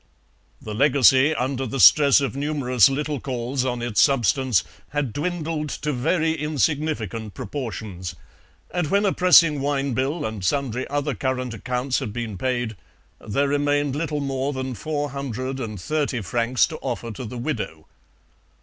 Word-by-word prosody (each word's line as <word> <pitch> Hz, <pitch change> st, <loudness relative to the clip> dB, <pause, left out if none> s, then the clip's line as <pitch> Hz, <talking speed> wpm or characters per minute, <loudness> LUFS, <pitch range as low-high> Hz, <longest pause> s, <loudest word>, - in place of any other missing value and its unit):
The 110 Hz, -, -7 dB
legacy, 135 Hz, +3 st, +5 dB
under 130 Hz, 0 st, -2 dB
the 135 Hz, +4 st, -4 dB
stress 145 Hz, +1 st, +7 dB
of 135 Hz, -1 st, -2 dB
numerous 135 Hz, -6 st, +3 dB
little 145 Hz, +1 st, -2 dB
calls 125 Hz, 0 st, -2 dB
on 125 Hz, -2 st, -2 dB
its 120 Hz, -3 st, +2 dB
substance, 125 Hz, -, +3 dB, 0.3 s
had 140 Hz, -5 st, -2 dB
dwindled 160 Hz, -1 st, -2 dB
to 150 Hz, +2 st, -3 dB
very 160 Hz, +5 st, +1 dB
insignificant 150 Hz, -, -2 dB
proportions, 105 Hz, -, -5 dB, 0.6 s
and 175 Hz, -3 st, 0 dB
when 200 Hz, +3 st, +2 dB
a 195 Hz, -, +2 dB
pressing 165 Hz, -5 st, +5 dB
wine 140 Hz, -1 st, 0 dB
bill 140 Hz, +5 st, -1 dB
and 110 Hz, -3 st, -5 dB
sundry 130 Hz, +3 st, -1 dB
other 145 Hz, 0 st, -1 dB
current 130 Hz, -1 st, -2 dB
accounts 125 Hz, +4 st, -2 dB
had 105 Hz, -, -5 dB
been 115 Hz, -3 st, -4 dB
paid, 120 Hz, +1 st, -2 dB, 0.4 s
there 140 Hz, +7 st, 0 dB
remained 145 Hz, -1 st, +1 dB
little 150 Hz, -1 st, -2 dB
more 135 Hz, 0 st, -2 dB
than 130 Hz, -1 st, -4 dB
430 135 Hz, -, -3 dB
francs 120 Hz, +5 st, +1 dB
to 155 Hz, -, -7 dB
offer 120 Hz, -4 st, -4 dB
to 110 Hz, -, -7 dB
the 120 Hz, +2 st, -7 dB
widow. 115 Hz, -, -4 dB
135 Hz, 140 wpm, -23 LUFS, 120-145 Hz, 0.6 s, stress